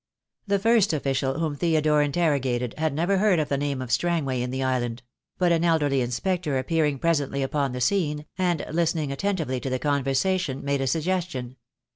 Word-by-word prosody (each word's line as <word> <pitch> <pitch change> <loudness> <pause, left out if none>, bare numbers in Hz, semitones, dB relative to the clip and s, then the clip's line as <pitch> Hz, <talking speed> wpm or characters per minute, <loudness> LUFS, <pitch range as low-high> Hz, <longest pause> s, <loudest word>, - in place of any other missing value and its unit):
The 200 0 +2
first 220 -2 +3
official 135 -2 -1
whom 155 -3 -1
Theodore 155 -1 +2
interrogated 140 -6 0
had 160 -1 +1
never 175 +7 +1
heard 205 -3 +3
of 150 -2 -1
the 140 - +1
name 140 -2 -2
of 125 - -7
Strangway 140 -4 0
in 125 - -2
the 130 +1 -2
island; 120 -2 -1 0.3
but 180 -1 +2
an 165 0 +2
elderly 150 -5 +2
inspector 150 +5 -1
appearing 150 +1 0
presently 140 -3 0
upon 140 0 -1
the 125 0 -5
scene, 150 -2 0
and 175 -4 0
listening 160 -3 0
attentively 155 -5 -1
to 135 - -4
the 130 - 0
conversation, 140 +3 0
made 140 -1 0
a 135 - 0
sug 155 +5 0
gestion. 165 -9 -2
145 Hz, 180 wpm, -25 LUFS, 135-170 Hz, 0.3 s, first